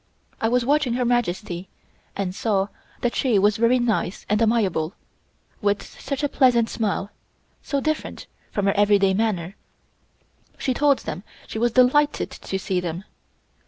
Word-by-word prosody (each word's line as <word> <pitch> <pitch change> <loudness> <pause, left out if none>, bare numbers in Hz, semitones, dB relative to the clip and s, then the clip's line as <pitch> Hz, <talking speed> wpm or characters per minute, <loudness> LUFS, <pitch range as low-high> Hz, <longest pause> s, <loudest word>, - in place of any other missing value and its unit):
I 225 - +2
was 245 0 +2
watching 280 -2 +2
Her 250 0 0
Majesty 195 -6 -1 0.5
and 190 -2 -2
saw 200 -1 0 0.3
that 245 - 0
she 245 -6 +2
was 205 +1 +3
very 230 +3 +4
nice 225 -6 -1
and 210 +2 +1
amiable, 200 -8 +1 0.7
with 205 -1 +1
such 275 0 -6
a - - +3
pleasant 245 -5 +3
smile 205 -2 -2 0.5
so 280 - -1
different 310 +2 -3 0.2
from 205 - -1
her 195 - +3
everyday 200 -1 +4
manner. 195 -3 -1 1.0
She 260 - -1
told 280 +1 +3
them - - -4 0.2
she 220 - -5
was 240 0 +1
delighted 290 +4 +3
to 190 - -5
see 190 -1 -1
them. 175 +1 -4
220 Hz, 150 wpm, -23 LUFS, 195-250 Hz, 1.0 s, very